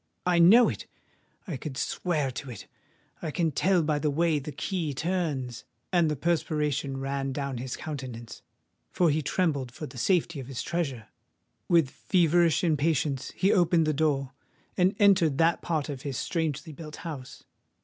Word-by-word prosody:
I 175 -1 +3
know 215 +9 +8
it—I 170 -8 -9
could 135 0 -7
swear 150 -5 -1
to 135 +2 -7
it: 120 - -8 0.6
I 165 - -3
can 165 +1 0
tell 180 +4 +2
by 150 -1 0
the 150 - 0
way 160 +1 +1
that 140 - -12
the - - -5
key 155 0 -3
turns!" 150 -7 -2 0.3
And 170 -3 +4
the 150 - 0
perspiration 150 -3 -1
ran 135 0 -2
down 140 -3 -3
his 130 0 -5
countenance:—for 135 - -4
he 155 +2 +1
trembled 145 -6 0
for 155 - -7
the 135 -4 -9
safety 170 -1 +1
of 130 - -7
his 125 -3 -4
treasure! 135 -10 -3 0.6
With 165 -6 +4
feverish 170 -3 +2
impatience 150 -4 +1
he 195 +2 +3
opened 175 -3 +3
the 155 - +1
door, 140 -3 0 0.4
and 185 +1 +2
entered 185 -8 +4
that 165 +1 +3
part 155 -4 -1
of 140 -4 -6
his 140 -4 -4
strangely 160 -1 -2
built 150 0 -9
house. 140 -6 -7
155 Hz, 160 wpm, -28 LUFS, 135-170 Hz, 0.6 s, know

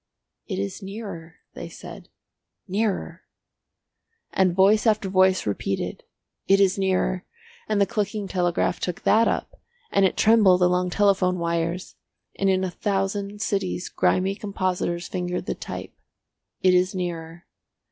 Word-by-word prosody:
"It - - -3
is 100 0 -4
nearer," 190 -5 -8 0.2
they - - -7
said. - - -11 0.6
"Nearer!" 200 +1 -2 1.1
And 185 -2 +2
voice 205 +4 +4
after 210 -3 +2
voice 185 0 +3
repeated, 100 -1 -3 0.5
"It 195 0 +5
is 195 -1 +4
nearer," 190 -1 0 0.5
and 215 -1 +1
the 200 - +5
clicking 210 -2 -2
telegraph 175 -1 0
took 180 +3 -4
that 225 +2 +4
up, - - -3 0.3
and 195 - +3
it 190 - +2
trembled 210 -5 +5
along 180 0 +2
telephone 190 -1 +2
wires, 170 +1 -2 0.4
and 195 - +1
in 190 0 +2
a 185 - -2
thousand 200 +1 -2
cities 190 -3 -2
grimy 190 +1 +1
compositors 185 -4 -2
fingered 180 -1 -3
the - - -1
type. - - -7 0.7
"It 185 -1 +5
is 180 +1 +2
nearer." 170 -2 -5
185 Hz, 135 wpm, -24 LUFS, 180-200 Hz, 1.1 s, It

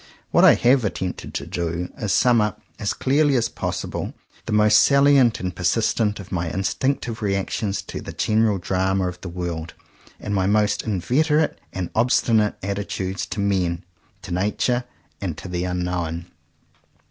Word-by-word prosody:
What - - +4
I - - +8
have 125 +1 +3
attempted 95 -3 -4
to - - -3
do 85 +1 -3
is - - -14
to 105 - -2
sum 120 +3 +4
up 105 0 -1 0.2
as 105 - -1
clearly 140 +1 +2
as 120 - +1
possible, - - -4 0.3
the - - -3
most 105 0 +5
salient 140 -2 +5
and 90 -1 -4
persistent 105 +3 +1
of 95 - -10
my 85 -3 -1
instinctive 115 - -1
reactions 100 0 -1
to - - -7
the - - -7
general 110 -1 +2
drama 95 +1 0
of 90 0 -6
the 95 - -6
world; 85 -2 -5 0.4
and 105 - -4
my 95 -2 +1
most 105 0 +2
inveterate 150 - +1
and 90 -2 -4
obstinate 110 -2 +2
attitudes 100 -1 -3
to 95 - -5
men, 95 -4 0 0.4
to - - -8
nature, 105 +6 0 0.4
and 85 -6 -3
to - - -8
the 90 0 -2
unknown. 90 -2 -2
100 Hz, 160 wpm, -22 LUFS, 90-115 Hz, 0.4 s, I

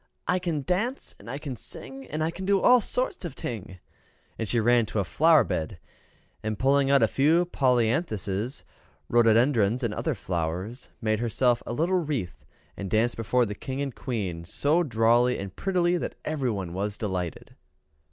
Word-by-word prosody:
"I 180 +2 +2
can 165 -5 -2
dance, 215 - -2
and - - -12
I 135 - -4
can 145 -3 -6
sing, 135 +4 -10
and 155 +1 -2
I 160 - 0
can 185 +3 -7
do 195 +1 +3
all 250 +4 +6
sorts 250 0 -1
of 170 -6 -6
ting." 95 -5 -6 0.6
And 110 - -2
she 120 - +1
ran 120 0 +3
to - - -5
a 100 - +2
flower 160 - +4
bed, 80 -1 -3 0.6
and, 110 -1 -3
pulling 135 +3 +3
a 140 0 +5
few 160 +6 +3
polyanthuses, 120 - 0 0.5
rhododendrons, 120 0 +3
and 115 -3 0
other 155 +5 -2
flowers, 90 - -4
made 110 -1 +1
herself 120 +1 +1
a - - -3
little 175 +7 +1
wreath, 140 - -4 0.3
and 100 - -5
danced 115 +3 +2
before 120 +2 +1
the 105 - -4
King 130 +5 -6
and 140 -2 -2
Queen 95 -11 -4
so 145 - +1
drolly 120 -3 +3
and 100 -1 -7
prettily, 180 -2 +1
that - - -4
everybody 120 - -2
was 100 +3 -3
delighted. 90 -6 -4
120 Hz, 170 wpm, -26 LUFS, 105-155 Hz, 0.6 s, all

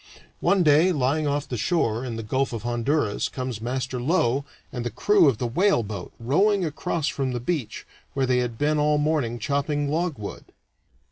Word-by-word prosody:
One 195 -2 +3
day, 155 +4 +5
lying 145 0 +1
off 145 0 -1
the 125 - -4
shore, 115 - 0
in 120 -3 -4
the 115 - -5
Gulf 130 +4 -1
of 115 -2 -5
Honduras, 120 -1 0
comes 130 -4 -5
Master 125 +1 -3
Low 140 -2 +1 0.3
and 120 -3 -4
the 120 - -2
crew 195 - +4
of 120 - -1
the 125 - -2
whaleboat 120 - 0
rowing 190 - +2
across 155 0 -2
from 135 -4 -1
the 120 - -2
beach, 135 -1 -3 0.3
where 135 -1 +2
they 125 -1 +2
had 120 -2 -2
been 150 +2 +1
all 150 0 +3
morning 145 -6 0
chopping 145 +4 -1
logwood. 155 - -3
135 Hz, 180 wpm, -25 LUFS, 120-155 Hz, 0.3 s, day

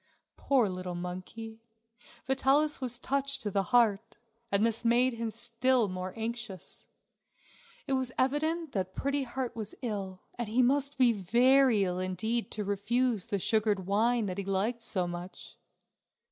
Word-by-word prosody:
Poor 260 -6 +2
little 185 -1 -5
monkey! 185 +6 -7 0.6
Vitalis 270 +3 +2
was 245 -2 0
touched 275 +1 -1
to 205 - -2
the 195 - +2
heart, 230 -4 +3 0.4
and 200 +2 +3
this 230 0 0
made 240 +2 +3
him 230 0 -3
still 235 +1 +1
more 185 0 -4
anxious. 225 -3 -4 1.0
It 275 - -1
was 260 -1 0
evident 310 +4 0
that 190 -4 -3
Pretty 280 +1 0
Heart 250 0 -4
was 215 -2 -6
ill 195 -5 -4 0.2
and 235 -3 -2
he 245 +4 +3
must 280 +3 +2
be 250 -3 +5
very 240 +3 +4
ill 180 -1 -1
indeed 200 +6 -1
to 210 - -3
refuse 220 +2 0
the 205 -3 -1
sugared 210 -1 +1
wine 225 +4 +2
that 185 0 -4
he - - -2
liked 200 +5 -1
so 185 -5 -1
much. 175 +1 -8
230 Hz, 150 wpm, -30 LUFS, 195-255 Hz, 1.0 s, be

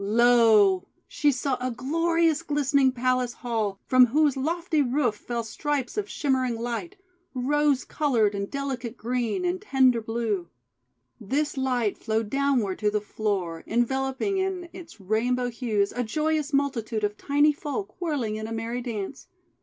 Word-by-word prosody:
Lo! 220 -3 +5 0.2
she 295 -4 +2
saw 260 +1 -1
a 255 - -1
glorious 330 +5 +1
glistening 280 -4 +2
palace 255 -1 0
hall 220 -5 -2
from 255 -1 +6
whose 295 +3 +2
lofty 320 +3 0
roof 255 -3 +1
fell 235 +2 -4
stripes 265 +3 -3
of 420 -1 -2
shimmering 260 -4 0
light, 240 +11 -4 0.4
rose 285 +2 +1
coloured, 235 -9 +1
and 200 0 -3
delicate 260 -4 -4
green, 245 - -1
and 355 +1 -1
tender 260 - +3
blue. 220 -6 -2 0.7
This 290 +8 -1
light 250 -5 0
flowed 220 -1 -1
downward 270 -8 +1
to 210 - +2
the 210 0 0
floor, 200 -6 -3
en 240 +2 +2
veloping 270 - -1
in 375 -2 -2
its 335 -9 -11
rainbow 245 +5 0
hues 220 -5 0
a 245 - -2
joyous 305 +5 -1
multitude 250 -6 -1
of 210 0 0
tiny 290 +5 +3
folk, 335 +7 -6
whirling 265 -11 -1
in 215 0 -5
a - - -8
merry 225 +2 -3
dance. 230 0 -5
250 Hz, 150 wpm, -26 LUFS, 225-290 Hz, 0.7 s, from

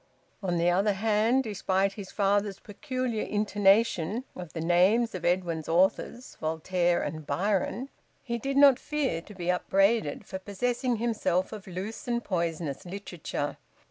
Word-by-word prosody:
On 180 -3 -1
the 170 +1 +3
other 200 +4 +2
hand, 220 +5 +2
despite 195 -3 0
his 195 -2 -8
father's 200 -1 +1
peculiar 255 0 -3
intonation 205 0 +2
of 180 -3 -8
the 165 - -4
names 185 +8 +3
of 185 -2 -5
Edwin's 175 -3 0
authors 190 +8 +1
Voltaire 170 +2 +1
and 155 -2 -5
Byron 200 - 0 0.4
he 235 -2 -3
did 275 +3 -2
not 280 -3 +7
fear 280 - -1
to 210 - -13
be 180 -1 0
upbraided 195 -2 +1
for 190 - -6
possessing 240 +6 -1
himself 215 -5 0
of 210 -3 -9
loose 190 +7 -6
and 240 -1 0
poisonous 170 -6 -2
literature. 175 -6 -5
195 Hz, 140 wpm, -28 LUFS, 175-225 Hz, 0.4 s, not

